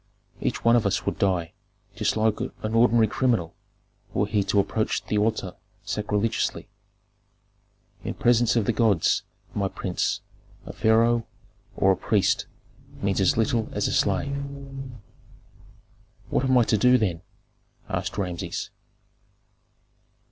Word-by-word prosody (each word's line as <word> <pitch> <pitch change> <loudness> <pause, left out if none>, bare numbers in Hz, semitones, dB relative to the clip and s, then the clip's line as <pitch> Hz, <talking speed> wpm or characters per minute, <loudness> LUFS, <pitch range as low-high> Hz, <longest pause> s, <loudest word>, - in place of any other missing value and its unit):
"Each - - -3
one 115 0 +6
of 115 -4 +3
us 95 - -1
would - - -2
die 90 -4 0 0.4
just - - 0
like 110 -1 +1
an 110 +1 -4
ordinary 115 0 +5
criminal 110 -6 0 0.6
were 100 - +2
he 105 0 +1
to 100 - +2
approach 110 +2 -1
the 105 - 0
altar 105 -4 0 0.3
sacrilegiously. 105 +1 -1 1.4
In - - -4
presence 120 -1 +3
of 115 -4 +2
the 120 - +1
gods, 105 -6 +2 0.3
my 100 -1 0
prince, 95 -1 -2 0.4
a - - -8
pharaoh 115 +1 +3 0.5
or 95 - +4
a - - +3
priest 100 +2 +1 0.6
means 100 0 +1
as 95 - +3
little 115 -1 +1
as - - 0
a - - -2
slave." 140 0 0 1.9
"What 135 - +1
am 130 -1 +4
I 120 - +6
to 110 -1 +1
do, 125 +3 +6
then?" 90 -8 -1 0.7
asked - - -3
Rameses. 90 -4 -3
110 Hz, 130 wpm, -25 LUFS, 100-115 Hz, 1.9 s, one